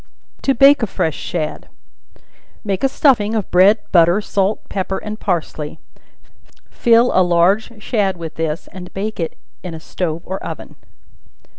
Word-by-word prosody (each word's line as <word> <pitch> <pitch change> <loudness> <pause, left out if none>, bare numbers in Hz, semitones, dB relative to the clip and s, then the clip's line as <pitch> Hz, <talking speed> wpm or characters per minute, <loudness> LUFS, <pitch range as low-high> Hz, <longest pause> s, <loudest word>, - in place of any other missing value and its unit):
To 270 - +1
Bake 275 +2 +6
a 225 - 0
Fresh 160 -5 -1
Shad. 155 -3 -4 0.9
Make 195 0 -2
a 270 - +4
stuffing 230 -6 +2
of 210 -4 -3
bread, 190 +4 +6
butter, 170 +2 +5
salt, 205 0 -1
pepper 190 -1 -3
and 215 0 -6
parsley; 160 -5 -3 0.9
fill 235 +1 +4
a 185 - +4
large 190 +6 +2
shad 200 -6 0
with 165 -2 -7
this, 160 +1 -3
and 180 -2 -9
bake 210 +2 -4
it 165 - -3 0.2
in 175 -3 -6
a - - -8
stove 165 0 -4
or 190 +1 -5
oven. - - -7
190 Hz, 150 wpm, -18 LUFS, 170-215 Hz, 0.9 s, Bake